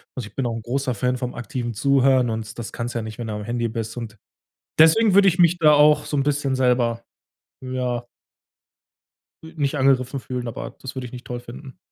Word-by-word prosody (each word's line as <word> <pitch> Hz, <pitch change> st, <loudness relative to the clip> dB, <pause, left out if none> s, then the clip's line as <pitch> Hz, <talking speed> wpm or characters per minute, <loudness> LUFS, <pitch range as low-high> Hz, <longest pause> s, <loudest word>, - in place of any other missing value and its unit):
Also, 125 Hz, -5 st, -5 dB
ich -, -, -18 dB
bin 135 Hz, -, -1 dB
auch 115 Hz, -1 st, -2 dB
'n 115 Hz, -, -5 dB
großer 130 Hz, +2 st, -1 dB
Fan 125 Hz, +3 st, -1 dB
vom 125 Hz, 0 st, -4 dB
aktiven 120 Hz, 0 st, -4 dB
Zuhören, 130 Hz, +1 st, +3 dB
und 110 Hz, -1 st, -5 dB
das 120 Hz, -1 st, -6 dB
kannst 120 Hz, +1 st, -4 dB
du -, -, 0 dB
ja -, -, -4 dB
nicht, 110 Hz, 0 st, -8 dB
wenn 120 Hz, -, -4 dB
du 110 Hz, -, -4 dB
am 105 Hz, 0 st, -5 dB
Handy 120 Hz, +2 st, -2 dB
bist 115 Hz, 0 st, -5 dB
und 110 Hz, -2 st, -7 dB, 0.6 s
deswegen 190 Hz, +7 st, +6 dB
würde 200 Hz, 0 st, +7 dB
ich 180 Hz, -1 st, +2 dB
mich 175 Hz, 0 st, +5 dB
da 155 Hz, -3 st, +5 dB
auch 150 Hz, 0 st, +5 dB
so 145 Hz, -, -2 dB
'n 140 Hz, -, +2 dB
bisschen 145 Hz, -2 st, 0 dB
selber, 120 Hz, -2 st, +1 dB, 0.6 s
ja 125 Hz, -2 st, -3 dB, 1.4 s
nicht 155 Hz, -3 st, -3 dB
angegriffen 135 Hz, -1 st, +2 dB
fühlen, 125 Hz, -1 st, -5 dB
aber 115 Hz, -, -7 dB
das 130 Hz, -, -7 dB
würde 130 Hz, -2 st, -5 dB
ich 115 Hz, -, -12 dB
nicht 125 Hz, -1 st, -9 dB
toll 120 Hz, -1 st, -5 dB
finden. 125 Hz, +2 st, -11 dB
125 Hz, 215 wpm, -22 LUFS, 120-140 Hz, 1.4 s, würde